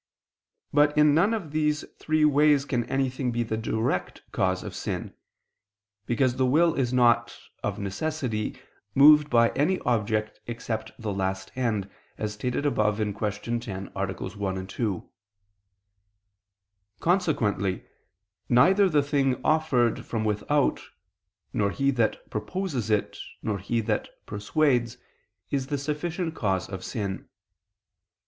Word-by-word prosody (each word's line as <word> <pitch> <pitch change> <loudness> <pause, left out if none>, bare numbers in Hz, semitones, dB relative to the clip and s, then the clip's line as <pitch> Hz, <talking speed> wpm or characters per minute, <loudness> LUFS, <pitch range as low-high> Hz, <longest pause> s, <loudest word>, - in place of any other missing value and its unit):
But 150 +1 +4
in 150 -1 +6
none 175 +8 +4
of 200 -10 -3
these 150 -1 0
three 155 0 +2
ways 145 -1 +4
can 125 -5 -1
anything 130 0 -1
be 120 0 0
the 110 -1 -2
direct 110 -2 -2
cause 95 0 0
of - - -7
sin, - - -4 0.9
because 125 +1 +1
the 130 - +3
will 165 +5 +4
is 130 -6 0
not, 120 -2 +3 0.2
of - - -2
necessity, 110 +2 -3 0.4
moved 150 +1 +7
by 115 -2 +5
any 175 +7 +1
object 110 -2 0
except 115 -2 -4
the 110 -4 -3
last 95 0 -2
end, 110 -6 -1 0.3
as 105 -1 -3
stated 125 +6 -2
above 105 -7 +2
(Q. 105 +2 -2
10, 95 -5 -6
AA. 100 +1 -1
1, 95 0 -4
2). 100 -1 -3 1.9
Consequently 115 - +1 0.6
neither 185 +11 +5
the 150 -4 +3
thing 140 -3 +1
offered 150 -7 +2
from 110 -2 -3
without, 110 +7 +1 0.7
nor 100 -1 +1
he 140 +6 +1
that 115 -4 0
proposes 125 - -3
it, 105 -2 0 0.2
nor 105 -2 -1
he 115 +5 -1
that 105 - -1 0.2
persuades, 120 +2 0 0.5
is 135 -2 -1
the 145 0 -1
sufficient 160 +4 -3
cause 95 - -1
of 95 -2 -7
sin. 100 -5 -4
120 Hz, 125 wpm, -26 LUFS, 105-145 Hz, 1.9 s, moved